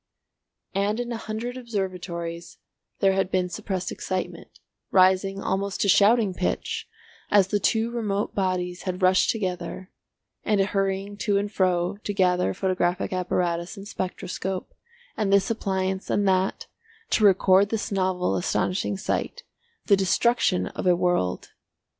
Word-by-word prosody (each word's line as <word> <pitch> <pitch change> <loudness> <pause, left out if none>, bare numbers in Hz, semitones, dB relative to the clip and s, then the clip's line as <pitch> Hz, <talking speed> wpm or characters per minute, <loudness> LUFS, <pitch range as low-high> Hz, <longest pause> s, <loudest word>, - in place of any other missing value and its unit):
And 200 +3 0
in 240 0 -3
a 235 - -2
hundred 225 +3 -5
observatories 180 -7 -5 0.4
there 195 -1 +4
had 190 -1 0
been 185 -1 0
suppressed 185 -1 -4
excitement, 185 -1 -5 0.3
rising 190 +1 +3
almost 195 +1 -1
to - - +2
shouting 205 +1 +5
pitch, 180 - -2 0.4
as 200 -2 +4
the 205 - +1
two 225 +3 +1
remote 210 -4 -2
bodies 180 -2 -1
had 185 0 -4
rushed 185 0 +4
together; 185 -3 -3 0.5
and 210 -3 +1
a 195 - +4
hurrying 195 0 -2
to 205 -1 +1
and 205 +1 -1
fro, 185 -1 +1
to 205 - -3
gather 180 -1 +2
photographic 185 -1 0
apparatus 180 0 -1
and 195 +1 -9
spectroscope, 185 0 -4 0.4
and 205 -2 0
this 200 +2 +3
appliance 190 -3 -2
and 200 -1 +1
that, 190 0 +1 0.5
to 215 - +2
record 195 0 +5
this 220 -1 -2
novel 185 -2 0
astonishing 185 +2 -1
sight, - - -3 0.4
the 200 - +5
destruction 195 0 +2
of - - -4
a 180 - +5
world. 175 - 0
190 Hz, 140 wpm, -25 LUFS, 185-205 Hz, 0.5 s, shouting